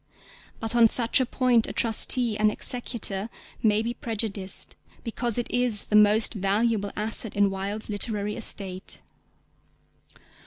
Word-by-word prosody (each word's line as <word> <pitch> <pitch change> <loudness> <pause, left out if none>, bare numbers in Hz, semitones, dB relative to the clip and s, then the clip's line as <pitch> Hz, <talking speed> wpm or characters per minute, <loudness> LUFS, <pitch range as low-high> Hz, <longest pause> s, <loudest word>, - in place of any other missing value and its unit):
But 225 +1 -4
on 235 -1 +6
such 235 +3 +4
a 255 - -1
point 245 -3 +1
a - - -6
trustee 230 0 +2
and 215 0 +2
executor 225 -4 -1 0.3
may 215 0 +2
be 235 +1 -3
prejudiced 210 -5 -4 0.3
because 235 -1 -1
it 240 - -1
is 245 -4 +2
the 210 - -3
most 210 +1 +4
valuable 205 +1 0
asset 215 0 -5
in 200 -1 +2
Wilde's 200 +3 -4
literary 210 0 -2
estate. 190 -4 -3
215 Hz, 130 wpm, -25 LUFS, 205-235 Hz, 0.3 s, on